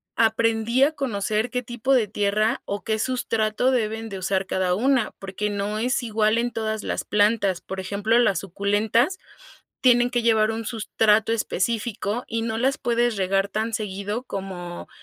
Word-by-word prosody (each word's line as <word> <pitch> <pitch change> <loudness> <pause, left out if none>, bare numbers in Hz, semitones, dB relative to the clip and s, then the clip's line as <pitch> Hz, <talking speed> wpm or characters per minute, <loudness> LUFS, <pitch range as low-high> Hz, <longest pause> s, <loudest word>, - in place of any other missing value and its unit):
aprendí 225 +2 +2
a 305 +3 +3
conocer 220 -4 -1
qué 250 +1 -2
tipo 240 +3 -1
de 230 -5 +3
tierra 210 +4 0
o 200 0 -4
qué 220 -1 -1
sustrato 230 0 0
deben 225 -2 -1
de 195 - -6
usar 190 +1 -1
cada 185 -1 0
una 255 +1 +2
porque 195 +2 -3
no 205 +1 -2
es 250 +2 0
igual 220 0 +1
en 240 +1 0
todas 220 -1 -3
las - - -2
plantas. 205 -3 +2
Por 190 0 -6
ejemplo, 205 +5 +1
las 200 -7 +3
suculentas 205 - +1 0.6
tienen 245 -1 +5
que 240 -1 0
llevar 220 -1 +3
un 225 0 -4
sustrato 220 -1 +2
específico 225 +2 -2
y 225 0 -2
no 225 -1 -2
las 265 +3 +1
puedes 240 -1 +1
regar 195 +1 +1
tan 220 +2 -2
seguido 205 +3 -3
como, 185 -5 -6
220 Hz, 165 wpm, -24 LUFS, 200-235 Hz, 0.6 s, tienen